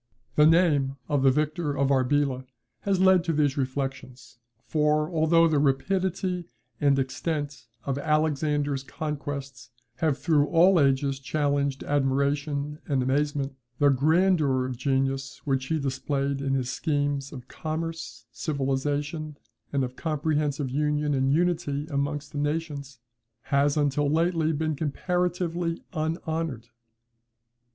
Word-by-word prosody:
The 150 Hz, 0 st, +6 dB
name 155 Hz, -5 st, +3 dB
of 145 Hz, -3 st, +1 dB
the 135 Hz, -, +5 dB
victor 150 Hz, +2 st, 0 dB
of 135 Hz, 0 st, +2 dB
Arbela 130 Hz, 0 st, +1 dB, 0.3 s
has 195 Hz, -2 st, 0 dB
led 190 Hz, -2 st, +5 dB
to 165 Hz, -, 0 dB
these 145 Hz, -3 st, +2 dB
reflections; 130 Hz, -2 st, -4 dB, 0.3 s
for, 150 Hz, 0 st, +2 dB
although 165 Hz, 0 st, +4 dB
the 155 Hz, -3 st, +2 dB
rapidity 180 Hz, +5 st, 0 dB, 0.3 s
and 140 Hz, -2 st, +3 dB
extent 145 Hz, +1 st, -3 dB, 0.2 s
of 140 Hz, 0 st, -1 dB
Alexander's 150 Hz, -2 st, 0 dB
conquests 140 Hz, -4 st, -5 dB, 0.3 s
have 155 Hz, -5 st, +1 dB
through 150 Hz, -3 st, +2 dB
all 175 Hz, +3 st, +5 dB
ages 135 Hz, -1 st, +2 dB
challenged 140 Hz, -1 st, -1 dB
admiration 140 Hz, +1 st, 0 dB
and 135 Hz, -3 st, +1 dB
amazement, 140 Hz, +1 st, 0 dB, 0.2 s
the 145 Hz, -, +4 dB
grandeur 150 Hz, -1 st, +3 dB
of 130 Hz, -1 st, -4 dB
genius 135 Hz, +1 st, -1 dB
which 135 Hz, -2 st, 0 dB
he 160 Hz, -1 st, 0 dB
displayed 140 Hz, 0 st, -2 dB
in 135 Hz, -1 st, 0 dB
his 125 Hz, -2 st, -1 dB
schemes 145 Hz, -2 st, -1 dB
of 130 Hz, -3 st, -9 dB
commerce, 160 Hz, -7 st, -5 dB
civilization, 145 Hz, +3 st, -2 dB, 0.3 s
and 140 Hz, -2 st, +1 dB
of 125 Hz, 0 st, -4 dB
comprehensive 150 Hz, -3 st, -1 dB
union 150 Hz, +1 st, 0 dB
and 135 Hz, 0 st, +2 dB
unity 160 Hz, -3 st, 0 dB
amongst 145 Hz, +1 st, -2 dB
nations, 145 Hz, -2 st, -3 dB, 0.5 s
has, 140 Hz, +1 st, +2 dB
until 145 Hz, 0 st, +1 dB
lately, 165 Hz, 0 st, +2 dB
been 155 Hz, 0 st, -1 dB
comparatively 175 Hz, +2 st, -1 dB
unhonoured. 160 Hz, -, -3 dB
145 Hz, 120 wpm, -26 LUFS, 135-155 Hz, 0.5 s, The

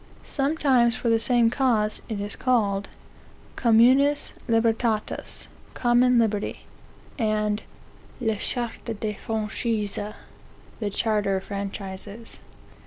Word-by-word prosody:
Sometime 275 Hz, -4 st, +2 dB
for 240 Hz, 0 st, -1 dB
the 225 Hz, 0 st, +4 dB
same 235 Hz, 0 st, +4 dB
cause 230 Hz, -5 st, +1 dB
(it 215 Hz, -3 st, -3 dB
is 205 Hz, 0 st, -2 dB
called) 205 Hz, -6 st, +1 dB, 0.7 s
communis 255 Hz, +5 st, +4 dB, 0.2 s
libertas, 225 Hz, -1 st, 0 dB, 0.3 s
(common 245 Hz, 0 st, +4 dB
liberty,) 215 Hz, -3 st, 0 dB, 0.6 s
and 215 Hz, -1 st, +1 dB, 0.6 s
le 220 Hz, -4 st, 0 dB
chartre 235 Hz, 0 st, -4 dB
des 215 Hz, -1 st, -2 dB
franchises, 215 Hz, 0 st, -2 dB, 0.8 s
(the 210 Hz, -3 st, -1 dB
charter 205 Hz, -2 st, +1 dB
of 190 Hz, -, -5 dB
franchises.) 200 Hz, +2 st, -6 dB
225 Hz, 100 wpm, -25 LUFS, 210-240 Hz, 0.8 s, the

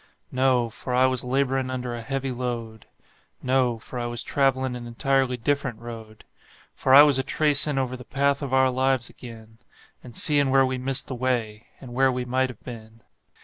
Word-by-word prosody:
No 130 Hz, -2 st, +2 dB
for 125 Hz, +3 st, -5 dB
I 130 Hz, +1 st, +4 dB
was 130 Hz, -1 st, 0 dB
laborin' 130 Hz, 0 st, 0 dB
under 125 Hz, -1 st, -4 dB
a 120 Hz, -, -6 dB
heavy 135 Hz, +2 st, -3 dB
load; 120 Hz, -3 st, -5 dB, 0.6 s
No 125 Hz, -2 st, +1 dB
for 120 Hz, +3 st, -8 dB
I 120 Hz, -, -2 dB
was 120 Hz, 0 st, -2 dB
travelin' 130 Hz, -2 st, 0 dB
an 120 Hz, -1 st, -7 dB
entirely 130 Hz, +1 st, 0 dB
different 135 Hz, -1 st, -1 dB
road; 115 Hz, -2 st, -10 dB, 0.5 s
For 130 Hz, -, +3 dB
I 145 Hz, -, +11 dB
was 145 Hz, -3 st, +3 dB
a -, -, 0 dB
tracin' 150 Hz, -1 st, +2 dB
over 130 Hz, -1 st, -1 dB
the 125 Hz, -, -10 dB
path 140 Hz, +3 st, 0 dB
of 140 Hz, -2 st, -5 dB
our 130 Hz, 0 st, +3 dB
lives 130 Hz, -1 st, 0 dB
ag'in, 110 Hz, -2 st, -13 dB, 0.4 s
And 120 Hz, -3 st, -11 dB
seein' 145 Hz, -2 st, +3 dB
where 135 Hz, 0 st, +4 dB
we 130 Hz, 0 st, -2 dB
missed 130 Hz, +1 st, +1 dB
the -, -, -5 dB
way, 120 Hz, -4 st, -2 dB
and 125 Hz, -2 st, -10 dB
where 135 Hz, +1 st, +3 dB
we 125 Hz, 0 st, -3 dB
might 130 Hz, +1 st, 0 dB
have 125 Hz, -, -11 dB
been. 115 Hz, -1 st, -11 dB
130 Hz, 190 wpm, -24 LUFS, 120-135 Hz, 0.6 s, I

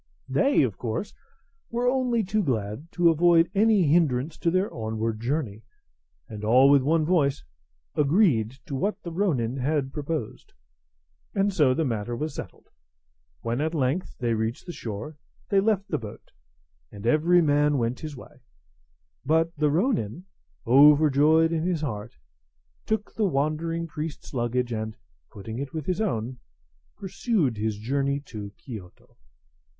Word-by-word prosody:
They, 275 Hz, -, +3 dB
of 110 Hz, -7 st, -2 dB
course, 115 Hz, -, -3 dB, 0.6 s
were 240 Hz, +1 st, -1 dB
only 250 Hz, -3 st, +1 dB
too 210 Hz, +3 st, 0 dB
glad 125 Hz, -, -3 dB
to 175 Hz, -1 st, +4 dB
avoid 170 Hz, +1 st, +4 dB
any 210 Hz, -1 st, +4 dB
hindrance 150 Hz, -2 st, +2 dB
to 170 Hz, -, +1 dB
their 185 Hz, +3 st, 0 dB
onward 110 Hz, 0 st, -3 dB
journey, 120 Hz, -4 st, -2 dB, 0.7 s
and 105 Hz, -1 st, -8 dB
all 130 Hz, +6 st, +6 dB
with 140 Hz, -1 st, +6 dB
one 155 Hz, +3 st, +2 dB
voice 150 Hz, -, +1 dB, 0.5 s
agreed 145 Hz, -, +3 dB, 0.2 s
to -, -, -7 dB
what 195 Hz, +11 st, -1 dB
the 170 Hz, -, -6 dB
ronin 140 Hz, -, 0 dB
had 135 Hz, 0 st, -1 dB
proposed; 150 Hz, -5 st, -5 dB, 0.8 s
and 200 Hz, 0 st, +1 dB
so 145 Hz, -8 st, +3 dB
the 160 Hz, -, 0 dB
matter 115 Hz, -2 st, -2 dB
was 150 Hz, +4 st, -4 dB
settled. -, -, -9 dB, 0.7 s
When, 120 Hz, +4 st, -2 dB
at 160 Hz, +2 st, -1 dB
length, 145 Hz, +5 st, -1 dB
they 120 Hz, -2 st, 0 dB
reached 110 Hz, +2 st, -2 dB
the 175 Hz, -, -6 dB
shore, 125 Hz, +3 st, -7 dB, 0.3 s
they 200 Hz, -, +4 dB
left 200 Hz, -1 st, +1 dB
the -, -, -2 dB
boat, 105 Hz, -3 st, -10 dB, 0.6 s
and 100 Hz, +1 st, -10 dB
every 160 Hz, +8 st, +4 dB
man 145 Hz, -1 st, +3 dB
went 120 Hz, 0 st, -1 dB
his 155 Hz, -3 st, -7 dB
way; -, -, -14 dB, 0.8 s
but 160 Hz, +4 st, +1 dB
the 150 Hz, -1 st, +2 dB
ronin, 175 Hz, -, 0 dB, 0.4 s
overjoyed 150 Hz, +4 st, +5 dB
in 165 Hz, -1 st, 0 dB
his 175 Hz, -3 st, -1 dB
heart, 110 Hz, -6 st, -5 dB, 0.7 s
took 215 Hz, -1 st, -2 dB
the 220 Hz, -, 0 dB
wandering 160 Hz, +3 st, -1 dB
priest's 155 Hz, -1 st, -7 dB
luggage, 120 Hz, 0 st, -1 dB
and, 110 Hz, 0 st, -4 dB, 0.3 s
putting 110 Hz, +4 st, -7 dB
it 140 Hz, +2 st, -5 dB
with 155 Hz, -3 st, -4 dB
his 185 Hz, +3 st, -1 dB
own, 125 Hz, -, -2 dB, 0.6 s
pursued 190 Hz, -, -1 dB
his 105 Hz, 0 st, -2 dB
journey 140 Hz, +5 st, -1 dB
to 105 Hz, -7 st, -8 dB
Kiyoto. 105 Hz, -9 st, -11 dB
145 Hz, 145 wpm, -26 LUFS, 120-170 Hz, 0.8 s, all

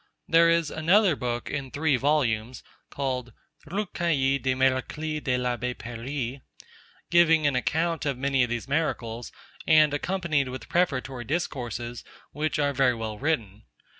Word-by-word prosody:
There 165 Hz, 0 st, +5 dB
is 165 Hz, -2 st, +2 dB
another 175 Hz, +3 st, +3 dB
book 120 Hz, -1 st, -3 dB
in 140 Hz, -2 st, -3 dB
three 145 Hz, +1 st, +1 dB
volumes 125 Hz, -4 st, 0 dB, 0.3 s
(called 130 Hz, -4 st, -3 dB, 0.3 s
Recueil 165 Hz, -7 st, 0 dB
des 130 Hz, 0 st, +1 dB
Miracles 135 Hz, +4 st, 0 dB
de 125 Hz, -3 st, 0 dB
l'Abbé 125 Hz, 0 st, -2 dB
Paris) 120 Hz, +3 st, -5 dB, 0.7 s
giving 165 Hz, -2 st, +5 dB
an 145 Hz, -2 st, +2 dB
account 160 Hz, +5 st, 0 dB
of 140 Hz, -3 st, -1 dB
many 135 Hz, 0 st, +1 dB
of 125 Hz, -, -1 dB
these 120 Hz, +1 st, -3 dB
miracles, 120 Hz, -6 st, -2 dB, 0.4 s
and 155 Hz, -2 st, +6 dB
accompanied 155 Hz, -4 st, 0 dB
with 125 Hz, -2 st, -7 dB
prefatory 135 Hz, -7 st, 0 dB
discourses, 120 Hz, -6 st, -3 dB, 0.3 s
which 155 Hz, +2 st, -2 dB
are 145 Hz, -1 st, +1 dB
very 130 Hz, -2 st, +3 dB
well 110 Hz, -2 st, -5 dB
written. 115 Hz, -9 st, -2 dB
135 Hz, 135 wpm, -26 LUFS, 125-155 Hz, 0.7 s, and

